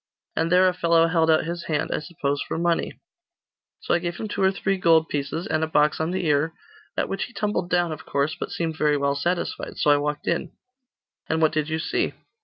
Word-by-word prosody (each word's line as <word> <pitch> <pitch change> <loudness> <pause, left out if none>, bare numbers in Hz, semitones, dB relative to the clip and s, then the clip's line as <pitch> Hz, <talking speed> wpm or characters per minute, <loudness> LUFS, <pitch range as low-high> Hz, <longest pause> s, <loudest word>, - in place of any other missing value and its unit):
And 165 +1 0
there 185 +1 +6
a 180 - +2
fellow 170 -2 +3
held 165 -1 +2
out 155 0 +4
his 170 +1 -4
hand 150 -2 -1
I - - 0
suppose 145 -2 -2
for - - -3
money, 170 0 0 0.8
So - - 0
I 175 - +3
gave 175 0 -4
him 220 - -4
two 205 - -3
or 190 0 +4
three 195 0 -1
gold 160 -2 +4
pieces, 145 +4 -3
and 155 0 0
a - - +1
box 150 -1 +2
on 160 +1 0
the 185 0 -2
ear, 150 +1 +2 0.4
at - - +1
which 195 - -2
he 245 - -15
tumbled 210 -5 -1
down, 175 -2 +2
of 155 0 -6
course, 140 +2 0
but - - -5
seemed 165 -2 -2
very 150 -1 +2
well 140 0 +1
satisfied. 170 +6 -2
So 150 - +3
I 145 - +5
walked 150 0 -2
in.' 170 - -1 0.8
'And 160 - +1
what 155 -1 +3
did 155 -1 -1
you 160 - -1
see? 160 - -1
160 Hz, 230 wpm, -24 LUFS, 150-175 Hz, 0.8 s, there